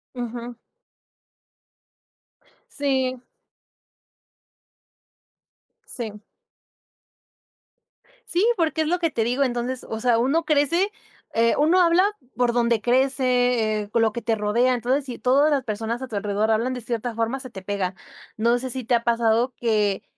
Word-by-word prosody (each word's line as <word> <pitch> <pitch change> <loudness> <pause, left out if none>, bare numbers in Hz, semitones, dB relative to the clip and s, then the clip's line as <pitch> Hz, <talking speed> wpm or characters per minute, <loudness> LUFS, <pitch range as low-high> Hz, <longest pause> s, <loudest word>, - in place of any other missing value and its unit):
Ujú. 240 0 -5 2.2
Sí. 260 -3 -1 2.7
Sí. 215 -3 -6 2.1
Sí, 360 +5 +1
porque 320 -2 +1
es 310 - 0
lo 355 +2 +1
que 330 -3 0
te 225 - 0
digo. 250 +4 +1
Entonces, 245 0 -2
o 220 - -4
sea, 240 -1 +2
uno 275 +8 +1
crece, 315 +6 +2 0.4
eh, 230 0 +3
uno 330 +5 +4
habla 340 +1 +4 0.3
por 245 -1 +1
donde 235 -2 +2
crece, 250 -3 +2
eh, 205 - -12
con 230 - +2
lo 225 -1 +3
que 235 - -5
te 225 -1 0
rodea. 230 +5 +2
Entonces 255 +4 0
si 250 -3 -7
todas 280 +4 +3
las 280 -3 +1
personas 225 +2 -3
a 260 - -5
tu 225 - -7
alrededor 205 +2 0
hablan 230 +4 +1
de 250 - -5
cierta 235 +1 -3
forma, 230 +4 -1
se 255 -1 -8
te 190 -4 -9
pega. 190 -1 -3 0.4
No 235 +2 +2
sé 260 +1 -5
si 255 0 -4
te 240 +2 +2
ha 235 - 0
pasado 235 +1 +2
que 210 -4 0
245 Hz, 145 wpm, -23 LUFS, 225-265 Hz, 2.7 s, uno